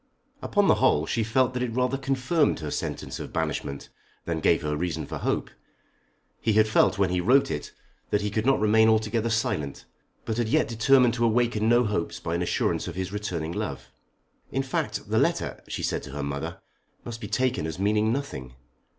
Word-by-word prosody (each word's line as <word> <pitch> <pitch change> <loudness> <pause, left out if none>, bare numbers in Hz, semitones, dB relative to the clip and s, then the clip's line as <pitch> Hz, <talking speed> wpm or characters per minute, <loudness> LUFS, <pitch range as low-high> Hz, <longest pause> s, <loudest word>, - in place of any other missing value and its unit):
Upon - - +2
the - - +6
whole 75 +1 +4
she 115 - 0
felt 125 +3 +2
that 125 - -2
it 120 -2 -2
rather 125 +1 +1
confirmed 135 +3 +1
her 75 -1 -4
sentence - - -4
of - - -7
banishment 70 0 -3 0.4
than - - -2
gave - - +2
her 75 0 -1
reason 85 0 -2
for - - -6
hope. - - -1 0.9
He 110 - +1
had 110 +1 +4
felt 110 - +3
when 95 -2 +2
he 90 0 +1
wrote 135 +8 +4
it 75 - -4 0.4
that 105 - +1
he 105 0 -2
could 110 +1 0
not 135 +2 +3
remain 110 +1 +5
altogether 110 +1 +1
silent, 75 -11 -2 0.4
but 110 - -2
had 120 -2 0
yet - - +3
determined 120 +2 +4
to 120 0 +1
awaken 115 -1 +2
no 120 +1 +5
hopes 105 -6 -2
by 80 - -3
an 85 - 0
assurance 90 - 0
of 90 - -6
his 95 +1 -4
returning 85 -6 -3
love. 85 - -5 0.6
"In 135 - 0
fact, 135 - -3
the - - +3
letter," - - 0
she - - -4
said - - -1
to 65 - -10
her 75 0 -3
mother, 70 0 -4 0.5
"must 115 -1 -7
be 105 - -5
taken 130 -8 0
as 80 - -5
meaning 105 +3 +2
nothing. 65 - -4
110 Hz, 200 wpm, -26 LUFS, 90-120 Hz, 0.9 s, the